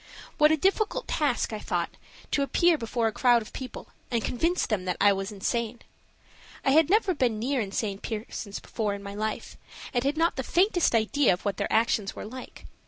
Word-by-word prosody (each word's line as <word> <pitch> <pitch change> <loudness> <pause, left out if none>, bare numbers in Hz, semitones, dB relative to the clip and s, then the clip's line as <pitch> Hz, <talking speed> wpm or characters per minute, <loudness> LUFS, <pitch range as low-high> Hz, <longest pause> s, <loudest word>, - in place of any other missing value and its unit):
What 300 0 +6
a 315 - +3
difficult 415 - 0
task, 280 -6 0
I 215 - -3
thought, 175 -3 -2 0.4
to 285 - +2
appear 340 +5 +3
before 235 -3 -2
a 225 - +2
crowd 240 0 +3
of - - -14
people 260 -1 -7 0.2
and 235 -3 0
convince 335 +8 0
them 200 -5 -1
that 180 - -1
I 205 0 +6
was 195 +1 -4
insane. 230 +3 -2 0.8
I 270 - +4
had 315 +2 +5
never 405 -1 +3
been 250 -8 +1
near 255 +4 0
insane 200 0 -2
persons 210 -2 -5
before 210 -3 -2
in 200 - -9
my 200 0 -6
life, 215 +1 -4 0.4
and 245 -1 +1
had 280 +3 0
not 330 -1 +2
the 265 - -1
faintest 355 - +2
idea 230 +2 +3
of 180 - -6
what 200 -2 -1
their - - -2
actions 220 -3 +1
were - - -6
like. 255 +4 -10
235 Hz, 200 wpm, -27 LUFS, 210-295 Hz, 0.8 s, What